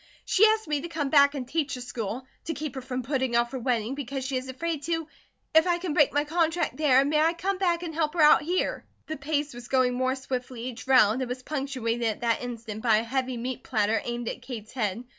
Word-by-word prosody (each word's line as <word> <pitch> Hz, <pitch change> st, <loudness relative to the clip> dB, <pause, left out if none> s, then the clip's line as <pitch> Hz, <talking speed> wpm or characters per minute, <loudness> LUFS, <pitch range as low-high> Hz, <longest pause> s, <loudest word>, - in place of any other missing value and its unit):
"She 390 Hz, -, +3 dB
asked 440 Hz, -2 st, +1 dB
me 295 Hz, -2 st, 0 dB
to 340 Hz, -, -5 dB
come 305 Hz, -5 st, -3 dB
back 280 Hz, -1 st, +6 dB
and 255 Hz, -3 st, -4 dB
teach 300 Hz, -1 st, -1 dB
the 250 Hz, -, -7 dB
school 240 Hz, 0 st, -5 dB, 0.2 s
to 325 Hz, -, -3 dB
keep 300 Hz, -2 st, -4 dB
her 265 Hz, -, -5 dB
from 255 Hz, 0 st, -4 dB
putting 260 Hz, -1 st, -1 dB
off 235 Hz, 0 st, +2 dB
her 265 Hz, -, -4 dB
wedding 235 Hz, -1 st, 0 dB
because 275 Hz, -1 st, -4 dB
she 265 Hz, 0 st, -2 dB
is 255 Hz, +1 st, -3 dB
afraid 310 Hz, +3 st, -3 dB
to 325 Hz, -1 st, -1 dB, 0.5 s
If 320 Hz, +2 st, +6 dB
I 350 Hz, -1 st, +2 dB
can 350 Hz, -3 st, -3 dB
break 295 Hz, -2 st, +4 dB
my 290 Hz, +1 st, +1 dB
contract 330 Hz, +1 st, 0 dB
there 275 Hz, -3 st, +4 dB
may 300 Hz, +1 st, +2 dB
I 325 Hz, +2 st, +3 dB
come 375 Hz, +3 st, -2 dB
back 350 Hz, -2 st, +1 dB
and 330 Hz, -2 st, -5 dB
help 310 Hz, 0 st, -1 dB
her 335 Hz, -, +2 dB
out 300 Hz, -, +7 dB
here?" 355 Hz, +5 st, -1 dB, 0.2 s
The 315 Hz, -, -4 dB
pace 290 Hz, 0 st, -2 dB
was 240 Hz, 0 st, -9 dB
going 255 Hz, -2 st, +2 dB
more 260 Hz, +1 st, 0 dB
swiftly 255 Hz, -2 st, -5 dB
each 250 Hz, 0 st, -7 dB
round, 255 Hz, -2 st, +5 dB
it 260 Hz, -, -2 dB
was 250 Hz, +1 st, -5 dB
punctuated 255 Hz, -6 st, -2 dB
at 215 Hz, -, -2 dB
that 230 Hz, -1 st, +1 dB
instant 230 Hz, -3 st, -6 dB
by 225 Hz, -2 st, +4 dB
a 220 Hz, -, 0 dB
heavy 255 Hz, +1 st, -2 dB
meat 250 Hz, +2 st, -4 dB
platter 220 Hz, -2 st, +1 dB
aimed 240 Hz, -1 st, -4 dB
at -, -, -4 dB
Kate's 240 Hz, -4 st, -8 dB
head. 225 Hz, -2 st, -2 dB
265 Hz, 245 wpm, -27 LUFS, 245-305 Hz, 0.5 s, out